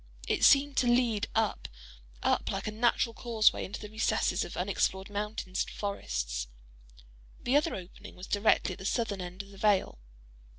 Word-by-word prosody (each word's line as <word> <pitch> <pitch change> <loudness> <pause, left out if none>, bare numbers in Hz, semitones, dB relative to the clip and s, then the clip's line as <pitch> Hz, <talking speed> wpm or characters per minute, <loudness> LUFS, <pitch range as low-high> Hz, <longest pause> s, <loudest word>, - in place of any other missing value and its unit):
It - - 0
seemed 280 0 +5
to 250 - +3
lead 240 -3 +2
up, 220 -1 0 0.6
up - - +1
like - - -3
a 215 - -2
natural 230 +1 +1
causeway, 225 -2 +2
into 195 - -7
the 210 - -7
recesses 220 +1 +1
of - - -8
unexplored 190 +2 -1
mountains 205 -2 -3
and - - -9
forests. - - -3 0.9
The 250 - 0
other 305 +3 +2
opening 190 +2 -10
was 180 - -9
directly 205 -2 +2
at - - -12
the 190 - -8
southern 210 -3 -1
end 180 +2 -6
of 200 - -16
the 195 - -14
vale. 205 - +2
210 Hz, 170 wpm, -30 LUFS, 190-230 Hz, 0.9 s, seemed